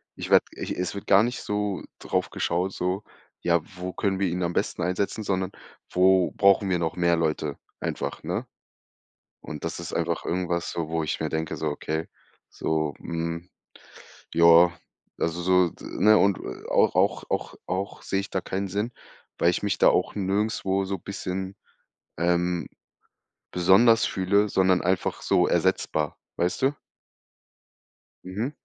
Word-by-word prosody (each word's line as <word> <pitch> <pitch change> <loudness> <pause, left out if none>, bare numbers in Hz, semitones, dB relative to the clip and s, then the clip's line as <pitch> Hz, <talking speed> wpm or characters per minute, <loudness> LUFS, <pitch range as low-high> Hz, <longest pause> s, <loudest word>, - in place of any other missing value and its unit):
Ich - - -6
werde - - +6
e - - -4
es 90 -1 -2
wird 100 - -7
gar 100 +1 +6
nicht 120 +2 -2
so 105 -2 -2 0.2
drauf - - -1
geschaut 90 +3 -1
so: 90 +3 -2 0.4
„Ja, 85 -1 +2 0.2
wo 90 0 -5
können 95 +1 -1
wir 100 - +2
ihn 90 +1 -1
am 85 0 -1
besten - - -1
einsetzen“, 90 +5 -1
sondern 95 -2 -1 0.4
„wo 95 0 +4
brauchen 100 0 +4
wir 90 -2 +1
noch 80 -1 -1
mehr 85 -1 +3
Leute“ 75 -3 -1 0.2
einfach, - - -4
ne? - - -2 1.0
Und 75 - -8
das 85 - -4
ist 85 - -6
einfach - - -1
irgendwas 85 -1 -1
so, 80 -2 -3
wo 80 0 -1
ich 75 - -2
mir 80 - -1
denke 80 +1 -2
so, 80 - -2
okay, 80 +2 -3 0.4
so, 80 -2 -1
hm, 85 +1 -4 0.8
ja, 85 +1 +7 0.5
also 85 +1 -1
so 90 0 +4
d - - -15
ne, 105 +3 +4
und 100 -2 +3 0.3
auch - - +4
auch - - +2
auch - - -2
auch 95 +2 -3
sehe 95 - -1
ich 100 - -7
da 95 - -1
keinen 95 +2 -3
Sinn, 105 +6 -2 0.5
weil 85 - +4
ich 90 - -2
mich 100 -1 0
da - - +6
auch - - +2
nirgendswo 100 -1 0
so 95 0 -3
bisschen, 95 0 -5 0.6
ähm, 85 -1 +1 0.9
besonders 100 +6 +5
fühle, 100 +3 +2
sondern 95 -1 +3
einfach 90 +1 0
so - - +3
ersetzbar, 75 -2 0 0.2
weißt 90 +1 0
du? 135 +2 +3 1.5
Mhm. 105 +9 -3
90 Hz, 155 wpm, -26 LUFS, 85-100 Hz, 1.5 s, ja